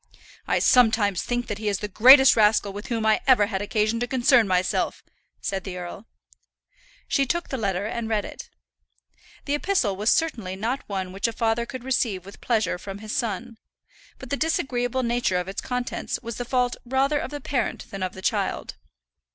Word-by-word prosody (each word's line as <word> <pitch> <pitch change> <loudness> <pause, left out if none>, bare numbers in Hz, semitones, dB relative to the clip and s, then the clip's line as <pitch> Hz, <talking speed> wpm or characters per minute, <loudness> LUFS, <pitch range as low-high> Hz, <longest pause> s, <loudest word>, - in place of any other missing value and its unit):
"I - - +2
sometimes 220 -6 +4
think 245 0 -2
that 210 -3 -5
he 215 - -4
is 200 - 0
the 210 - -4
greatest 260 +6 +8
rascal 210 -2 +3
with 205 +2 -7
whom 230 -3 -2
I 220 0 +3
ever 250 -6 +6
had 200 -2 -3
occasion 215 +2 0
to 245 - -1
concern 245 -2 +4
myself," 185 -1 0 0.4
said 195 -1 -3
the 185 -2 -6
earl. 180 +5 -8 1.0
She 275 -1 +1
took 345 +5 -2
the 265 - -3
letter 200 -3 -1
and 225 +1 -3
read 215 -2 0
it. - - -9 1.0
The 285 - -1
epistle 295 - +1
was 210 +4 +1
certainly 230 - 0
not 230 +7 -2
one 190 -2 -3
which 195 +4 -1
a - - -2
father 230 +1 0
could 260 -1 -7
receive 230 -8 -1
with 200 - -13
pleasure 220 -6 0
from 195 +1 -7
his 215 +1 -6
son; 230 0 -3 0.6
but 260 - -11
the 280 - 0
disagreeable 260 -5 -1
nature 235 -6 +1
of 180 0 -3
its 195 - -4
contents 250 0 -3
was 235 -1 -6
the 245 - -4
fault 250 0 0
rather 270 +4 +1
of - - -4
the 290 - -6
parent 255 -3 -3
than 195 - -6
of 185 0 -2
the 190 - -11
child. - - -2
225 Hz, 190 wpm, -24 LUFS, 200-250 Hz, 1.0 s, greatest